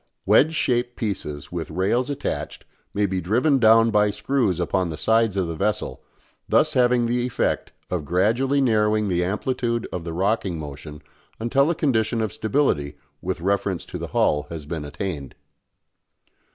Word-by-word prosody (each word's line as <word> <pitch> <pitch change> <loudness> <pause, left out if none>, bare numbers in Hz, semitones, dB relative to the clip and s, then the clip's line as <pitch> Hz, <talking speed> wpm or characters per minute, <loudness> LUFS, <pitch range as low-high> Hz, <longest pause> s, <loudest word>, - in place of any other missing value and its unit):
Wedge 160 +3 +4
shaped 120 -3 0
pieces 90 -9 -4
with 85 -3 -4
rails 100 - 0
attached 145 - -4 0.3
may 105 0 +1
be 95 -1 -1
driven 125 - +2
down 115 0 +6
by 105 -1 +3
screws 105 -2 0
upon 90 0 0
the 80 - -5
sides 110 +1 +2
of 95 -3 0
the 85 - -3
vessel, 105 +6 -2 0.5
thus 155 0 +3
having 125 -2 +3
the 120 +1 0
effect 125 - -1 0.2
of 90 -4 -1
gradually 115 - +2
narrowing 105 -4 +2
the 90 -1 +1
amplitude 115 +4 -1
of 90 - -4
the 85 - -5
rocking 95 0 0
motion 75 0 -8 0.4
until 135 +6 +2
a 170 - +1
condition 115 -6 +1
of 110 -2 -1
stability 75 - 0 0.2
with 90 -1 -3
reference 100 -1 -1
to - - -7
the - - -4
hull 75 0 +1
has 80 -3 -7
been 75 -1 -5
attained. 75 -2 -5
105 Hz, 160 wpm, -23 LUFS, 85-120 Hz, 0.5 s, down